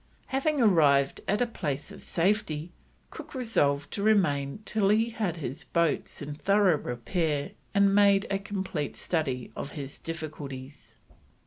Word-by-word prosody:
Having 280 +3 +1
arrived 145 -10 +4
at 205 +5 +2
a - - +1
place 150 - -4
of - - -11
safety, 170 -3 0 0.4
Cook - - -10
resolved 145 - +1
to 200 - -3
remain 180 -6 +2
till 210 -2 +2
he 225 +3 +3
had 210 -7 -2
his 140 -3 -5
boats 170 -3 0
in 145 +1 -5
thorough 195 +1 +3
repair 145 +5 -2 0.2
and 200 0 +6
had 195 - +3
made 200 -1 +5
a 195 - +1
complete 190 -7 -4
study 135 -8 -2
of 140 - -6
his 140 -2 -7
difficulties. 145 -4 -7
170 Hz, 145 wpm, -28 LUFS, 145-205 Hz, 0.4 s, and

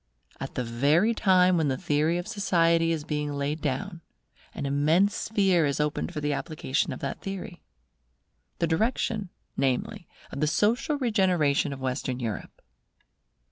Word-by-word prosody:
At - - -6
the 125 - -1
very 145 - +2
time 185 -4 +4
when 160 -2 +1
the 130 -2 0
theory 150 +5 +1
of 175 +2 -4
society 170 -6 +2
is 160 -3 -2
being 150 -2 -2
laid 145 +2 -2
down, 165 +6 -3 0.5
an - - -4
immense 155 +8 +2
sphere 195 -6 +2
is 140 - -2
opened 150 +3 -1
for 160 - -4
the 145 0 0
application 150 -2 -2
of - - -6
that 140 - -4
theory; 195 -2 -6 1.0
the - - +1
direction, 210 +3 0 0.3
namely, 130 -2 -1 0.2
of 135 - -6
the 150 - +2
social 235 - +1
regeneration 185 - +2
of 135 - -6
Western 130 0 -2
Europe. 115 -4 -5
160 Hz, 150 wpm, -27 LUFS, 140-190 Hz, 1.0 s, time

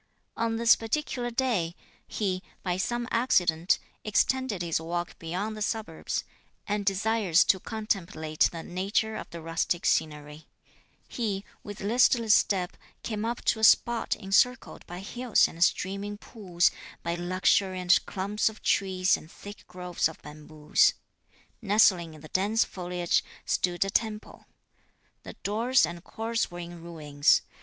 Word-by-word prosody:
On 230 0 -1
this 230 +1 +5
particular 240 +1 -2
day, 230 -9 -1 0.3
he, 185 -3 -2 0.2
by 180 -2 -1
some 240 +6 -2
accident, 180 -9 +2 0.3
extended 220 -2 +1
his 165 -1 -1
walk 175 +1 -4
beyond 185 +6 -3
the 215 - -8
suburbs, 210 -6 -3 0.4
and 205 0 -1
desirous 195 -3 +3
to 190 - +2
contemplate 190 -8 -1
the 165 -1 -7
nature 200 +5 -1
of - - -7
the 170 -1 -9
rustic 165 +2 -1
scenery, 150 0 -1 0.6
he, 205 -4 -3 0.2
with 205 -1 -8
listless 230 +1 +4
step, 185 -2 +1 0.3
came 215 -2 -3
up 235 +1 -3
to 220 - +2
a - - -6
spot 235 +1 +4
encircled 215 +5 +1
by 175 +1 -7
hills 240 +3 +2
and 170 +1 -1
streaming 200 +3 -1
pools, 185 -5 0 0.3
by 170 - -1
luxuriant 185 +1 +2
clumps 205 +3 0
of 220 - -14
trees 185 -2 +2
and 155 - -11
thick 205 +1 -12
groves 180 -2 -1
of 160 - -12
bamboos. 150 0 +1 0.7
Nestling 195 -6 +3
in 155 - -14
the 155 - -12
dense 210 +4 +2
foliage 180 -1 -1 0.2
stood 175 +1 0
a 195 - -3
temple. 215 0 -3 0.7
The - - -9
doors 230 +1 +3
and 170 +2 -8
courts 225 +2 -2
were 175 - -9
in 175 -1 -8
ruins. 150 -4 +1
195 Hz, 140 wpm, -28 LUFS, 170-220 Hz, 0.7 s, this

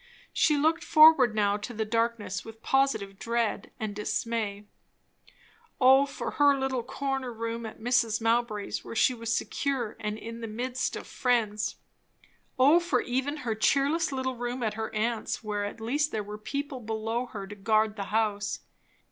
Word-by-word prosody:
She 300 -2 +3
looked 320 +3 +2
forward 310 -8 +7
now 205 -1 +2
to 220 +3 -7
the 220 0 -1
darkness 230 -4 -1
with 225 0 -12
positive 220 -8 +1
dread 235 -1 -1
and 215 -2 -4
dismay. 210 -1 -2 1.1
O 265 +2 +6
for 275 - -5
her 285 -1 +4
little 265 -2 -1
corner 270 +1 -3
room 230 0 -4
at 220 - -10
Mrs. 230 -1 +2
Mowbray's, 225 -2 0
where - - -8
she 255 - +4
was 230 -1 -4
secure, 245 -1 -1
and 210 -1 -3
in 230 +1 -8
the 230 - -4
midst 245 +4 -2
of - - -6
friends! 220 -4 0 0.8
O 285 +6 +6
for 340 -8 +1
even 265 +4 -2
her 225 - 0
cheerless 280 +9 +2
little 260 -1 -2
room 245 +1 -3
at 220 - 0
her 220 0 -4
aunt's, 230 +2 -1
where 205 -1 -2
at 205 - -6
least 290 +7 0
there 215 - -2
were 210 +1 -8
people 280 +4 -4
below 225 +2 -3
her 200 -4 -7
to 200 - -9
guard 215 +1 +1
the 200 -2 -4
house! 210 -1 -1
230 Hz, 165 wpm, -28 LUFS, 215-260 Hz, 1.1 s, forward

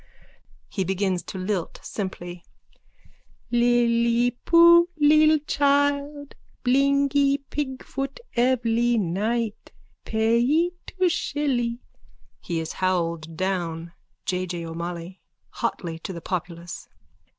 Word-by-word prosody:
(He 190 - -2
begins 190 0 0
to - - -7
lilt 185 -1 -3
simply.) 175 -3 -6 1.1
Li 240 0 +4
li 235 +1 +2
poo 340 +5 +6
lil 310 +1 +6
chile 285 0 +1 0.4
Blingee 280 +2 +3
pigfoot 275 -1 -4 0.2
evly 240 -1 +2
night 215 +4 -2 0.3
Payee 235 +10 +2 0.2
two 370 -1 +1
shilly... 265 -8 -1 0.6
(He 170 -1 -3
is 160 0 -4
howled 170 -3 -1
down.) 170 -3 -2 0.3
J. 185 0 -1
J. 170 -1 -4
O'MOLLOY: 170 +2 -6 0.3
_(Hotly 165 -2 -3
to - - -5
the 170 - -6
populace.) 170 -1 -5
235 Hz, 95 wpm, -24 LUFS, 180-280 Hz, 1.1 s, poo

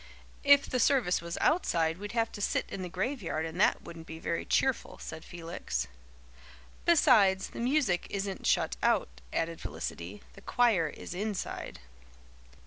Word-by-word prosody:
"If 285 -1 +6
the 255 - -1
service 240 -9 +3
was 170 0 -5
outside 170 - +2
we'd 205 +1 -6
have 230 -1 +1
to 205 - -7
sit - - +1
in 190 - -5
the 180 - -4
graveyard 190 - -2
and 165 +4 -3
that - - +3
wouldn't 165 -1 -10
be 160 - -7
very 165 +1 -2
cheerful," 265 -3 +1
said 160 0 -8
Felix. 165 - -4 1.0
"Besides, 220 - +5
the - - -8
music 245 - +1
isn't 195 -1 -3
shut - - +2
out," 60 0 +1
added 165 0 -2
Felicity. 90 +5 -6
"The 195 - -14
choir 220 -8 +3
is 150 - -8
inside." 205 - -4
190 Hz, 150 wpm, -30 LUFS, 165-235 Hz, 1.0 s, If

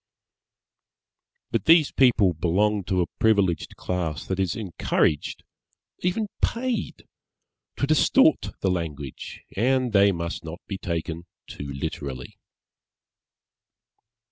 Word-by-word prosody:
_) - - -51
But - - -1
these 160 -2 +6
people 115 -8 +4
belong 100 +5 +1
to 90 -1 +1
a - - -5
privileged 100 -6 +2
class 85 -3 -3
that 95 0 -3
is 95 -4 0
encouraged 85 -6 -1 0.6
(even 180 +5 0 0.2
paid) 240 -2 -2 0.7
to - - 0
distort 265 - +4
the 95 - +2
language, 75 -6 -5
and 125 +2 +1
they 100 0 +6
must 85 -2 -4
not 80 +1 -7
be 95 - -5
taken 85 0 -4 0.2
too 70 0 -7
literally. 70 -1 -6
95 Hz, 110 wpm, -25 LUFS, 85-120 Hz, 0.7 s, these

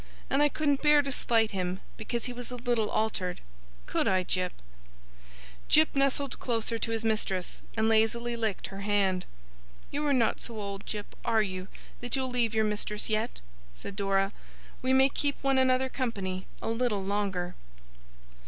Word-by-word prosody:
And 275 - +3
I 295 - +5
couldn't 285 -1 +1
bear 295 -1 +6
to 275 - -3
slight 225 -4 +2
him, 185 -1 -2 0.2
because 235 +1 -3
he 250 - -4
was 245 0 -6
a 250 - -5
little 240 -3 0
altered 195 -5 -1 0.5
could - - 0
I, 185 -1 +3
Jip?' 180 0 -1 1.1
Jip 310 -1 +5
nestled 275 -1 +1
closer 230 -1 -1
to 230 - -2
his 225 0 -1
mistress, 205 -4 0 0.2
and 220 0 +3
lazily 225 +2 +2
licked 220 -4 -1
her 195 - -7
hand. 195 -3 +1 0.6
'You 290 +1 -1
are - - +3
not 245 -5 +2
so 230 -2 -5
old, 200 -1 -5
Jip, 210 -1 -5
are 220 -1 +3
you, 185 -2 -4 0.3
that 245 +1 -3
you'll 260 -1 -1
leave 235 -3 +1
your 220 0 +3
mistress 210 0 -2
yet?' 220 +2 -1 0.3
said 195 - -8
Dora. 195 -1 +1 0.5
'We 255 +1 +2
may 265 0 +7
keep 285 +1 -1
one 270 -1 +3
another 260 0 +3
company 200 -8 -3 0.2
a - - -1
little 225 -4 0
longer! 190 -3 -1
225 Hz, 170 wpm, -29 LUFS, 200-255 Hz, 1.1 s, may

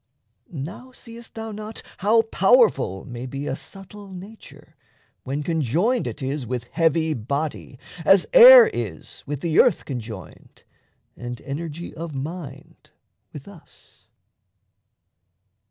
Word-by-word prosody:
Now 175 - -8
seest 235 -2 -12
thou 225 0 -6
not 215 +1 -8 0.2
how 220 +4 +3
powerful 205 - +2
may 125 -1 -7
be 135 +2 -6
A 135 - -2
subtle 195 +4 -11
nature, 195 +4 -13 0.5
when 140 +3 -3
conjoined 170 - 0
it 145 - -6
is 135 -1 -3
With 120 -1 -5
heavy 160 -1 +1
body, 140 +3 -4 0.3
as 195 +3 +5
air - - +11
is - - -6
with 145 -1 -4
the 165 -2 +1
earth - - +3
Conjoined, 110 - -9 0.5
and 120 -1 -7
energy 160 +4 -6
of 165 -2 -7
mind 145 -1 -8 0.4
with 145 -3 -11
us? 200 -5 -18
160 Hz, 120 wpm, -23 LUFS, 135-205 Hz, 0.5 s, air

